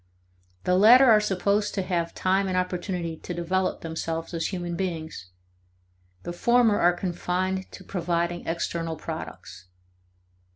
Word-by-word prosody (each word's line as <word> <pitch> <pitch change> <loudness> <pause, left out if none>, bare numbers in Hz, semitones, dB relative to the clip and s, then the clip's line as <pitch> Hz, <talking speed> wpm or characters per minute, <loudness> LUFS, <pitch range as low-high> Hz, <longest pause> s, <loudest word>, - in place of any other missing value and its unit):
The 180 - +2
latter 235 +8 +8
are 220 -4 +7
supposed 205 +1 0
to 195 - 0
have 170 -2 -2
time 190 +1 +1
and 185 -1 -1
opportunity 180 -2 -2
to 175 - -7
develop 185 +2 -1
themselves 165 +1 -4
as 165 -1 -1
human 175 -3 -4
beings; 160 - -4 1.0
the 175 - -5
former 235 +2 +3
are 175 +1 +4
confined 185 +1 -2
to - - -11
providing 175 -1 -2
external 165 0 -2
products. 90 - -8
180 Hz, 130 wpm, -26 LUFS, 170-190 Hz, 1.0 s, latter